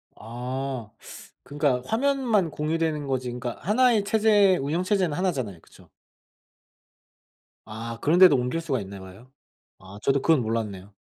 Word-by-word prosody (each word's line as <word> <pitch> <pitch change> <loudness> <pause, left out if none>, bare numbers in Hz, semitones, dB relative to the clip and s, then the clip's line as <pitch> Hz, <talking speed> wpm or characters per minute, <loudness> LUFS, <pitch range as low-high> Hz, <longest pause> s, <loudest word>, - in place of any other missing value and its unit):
아 125 +1 -5 0.5
그니까 140 -2 0
화면만 235 -6 +1
공유되는 155 -1 -2
거지 130 -2 -2
그니까 120 0 -5
1 250 +6 +3
의 215 -3 +2
체제 205 -2 +3
운영체제는 175 +3 0
1 185 0 +1
잖아요. 110 - -5
그쵸? - - -20 1.8
아 115 +1 -7
그런데도 175 +1 +6
옮길 125 +6 -1
수가 140 -6 -2
있나 100 0 -9
봐요? 95 +7 -14 0.5
아 95 +2 -12
저도 135 +2 +1
그건 160 -3 +3
몰랐네요. 105 -4 -4
140 Hz, 275 characters per minute, -25 LUFS, 115-185 Hz, 1.8 s, 그런데도